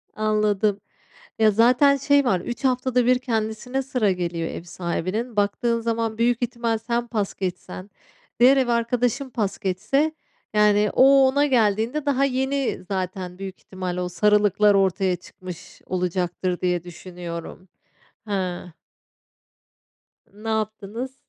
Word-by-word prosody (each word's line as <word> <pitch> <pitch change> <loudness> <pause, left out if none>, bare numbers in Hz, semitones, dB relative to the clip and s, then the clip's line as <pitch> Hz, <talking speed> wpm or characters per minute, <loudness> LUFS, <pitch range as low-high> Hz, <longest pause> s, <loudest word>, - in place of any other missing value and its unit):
Anladım. 210 -1 +1 0.6
Ya, 215 -1 +5
zaten 250 +6 +5
şey 285 +1 +3
var, 190 -7 +2
3 240 +8 -6
haftada 250 -1 +1
1 250 0 +4
kendisine 230 +2 -2
sıra 250 -6 +1
geliyor 170 -2 -2
ev - - -7
sahibinin, 185 +7 -3
baktığın 220 +3 +1
zaman, 225 -1 -2
büyük 240 +1 +1
ihtimal, 235 -2 -1
sen 235 +1 -2
pas 210 -4 -2
geçsen, 185 +1 -5 0.5
diğer 260 +3 +6
ev 260 -2 +2
arkadaşım 245 +3 0
pas 215 -5 -2
geçse, 220 +11 0 0.4
yani 210 0 +4
o, 270 0 +6
ona 285 +2 +2
geldiğinde 235 +3 +1
daha 275 -1 +2
yeni 265 -3 -1
zaten 185 -1 -4
büyük 195 -1 -7
ihtimalle 180 -1 -5
o 180 - -3
sarılıklar, 210 +2 +3
ortaya 190 -1 +2
çıkmış 180 -1 -11
olacaktır 180 0 -2
diye 180 -2 0
düşünüyorum. 175 0 -8 0.6
Hıı. 185 -3 -3 1.6
Ne 215 +2 -7
yaptınız? 220 +4 -3
215 Hz, 125 wpm, -23 LUFS, 185-245 Hz, 1.6 s, diğer